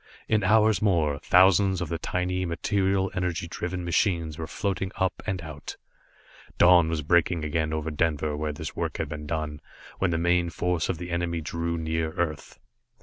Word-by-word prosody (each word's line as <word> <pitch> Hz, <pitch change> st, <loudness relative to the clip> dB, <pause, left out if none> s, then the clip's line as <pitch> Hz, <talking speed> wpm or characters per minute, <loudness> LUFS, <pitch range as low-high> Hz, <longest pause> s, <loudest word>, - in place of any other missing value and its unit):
In 105 Hz, -2 st, +2 dB
hours 105 Hz, 0 st, +4 dB
more, 80 Hz, -8 st, +2 dB
thousands 95 Hz, +2 st, +4 dB
of 85 Hz, -, -2 dB
the 85 Hz, -, -3 dB
tiny, 90 Hz, +2 st, -1 dB
material 95 Hz, +2 st, 0 dB
energy 90 Hz, -2 st, -2 dB
driven 90 Hz, +1 st, -4 dB
machines 85 Hz, -3 st, +1 dB
were 80 Hz, -, -4 dB
floating 95 Hz, 0 st, -2 dB
up 95 Hz, -1 st, -1 dB
and 95 Hz, -4 st, -2 dB
out. 75 Hz, -2 st, -8 dB, 0.8 s
Dawn 85 Hz, -2 st, +6 dB
was 80 Hz, -2 st, -2 dB
breaking 85 Hz, +1 st, +2 dB
again 80 Hz, +1 st, -1 dB
over 80 Hz, 0 st, -2 dB
Denver 75 Hz, -1 st, 0 dB
where 75 Hz, +1 st, -2 dB
this 75 Hz, -, -7 dB
work -, -, -3 dB
had -, -, -2 dB
been 75 Hz, -1 st, -6 dB
done, 75 Hz, -1 st, -3 dB, 0.4 s
when 95 Hz, -, +2 dB
the 85 Hz, -, 0 dB
main 85 Hz, +1 st, +2 dB
force 90 Hz, -1 st, -1 dB
of -, -, -1 dB
the 90 Hz, +1 st, -7 dB
enemy 85 Hz, -1 st, -1 dB
drew 85 Hz, +1 st, -3 dB
near 80 Hz, 0 st, -2 dB
Earth. 80 Hz, -5 st, -3 dB
85 Hz, 175 wpm, -26 LUFS, 80-90 Hz, 0.8 s, Dawn